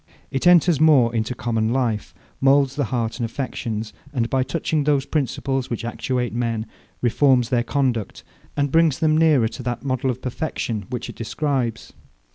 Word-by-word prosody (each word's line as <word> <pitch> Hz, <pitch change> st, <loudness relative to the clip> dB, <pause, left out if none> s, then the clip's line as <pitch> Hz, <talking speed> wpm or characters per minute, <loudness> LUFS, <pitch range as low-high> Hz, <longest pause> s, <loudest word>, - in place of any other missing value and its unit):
It 135 Hz, +6 st, 0 dB
enters 175 Hz, -3 st, +5 dB
more 135 Hz, -7 st, +5 dB
into 115 Hz, +2 st, -1 dB
common 115 Hz, -2 st, -1 dB
life; 120 Hz, -5 st, -1 dB, 0.2 s
moulds 135 Hz, 0 st, +3 dB
the 145 Hz, -2 st, 0 dB
heart 115 Hz, -2 st, -2 dB
and -, -, -1 dB
affections; 115 Hz, -3 st, -4 dB, 0.2 s
and, 120 Hz, -4 st, -1 dB
by 130 Hz, -, +2 dB
touching 145 Hz, +3 st, -1 dB
those 140 Hz, -2 st, +2 dB
principles 135 Hz, -3 st, -2 dB
which 120 Hz, 0 st, -4 dB
actuate 125 Hz, -1 st, -2 dB
men, 115 Hz, -2 st, -1 dB, 0.4 s
reforms 125 Hz, 0 st, +3 dB
their 120 Hz, -2 st, +2 dB
conduct, 125 Hz, -6 st, -1 dB, 0.3 s
and 145 Hz, -1 st, +1 dB
brings 165 Hz, -3 st, +3 dB
them 155 Hz, -1 st, +2 dB
nearer 155 Hz, -7 st, +4 dB
to 125 Hz, -, -8 dB
that 120 Hz, +1 st, -4 dB
model 130 Hz, 0 st, 0 dB
of 125 Hz, 0 st, -2 dB
perfection 120 Hz, -6 st, -3 dB
which 125 Hz, -2 st, -4 dB
it -, -, -9 dB
describes. 125 Hz, -1 st, -2 dB
130 Hz, 165 wpm, -22 LUFS, 115-140 Hz, 0.4 s, enters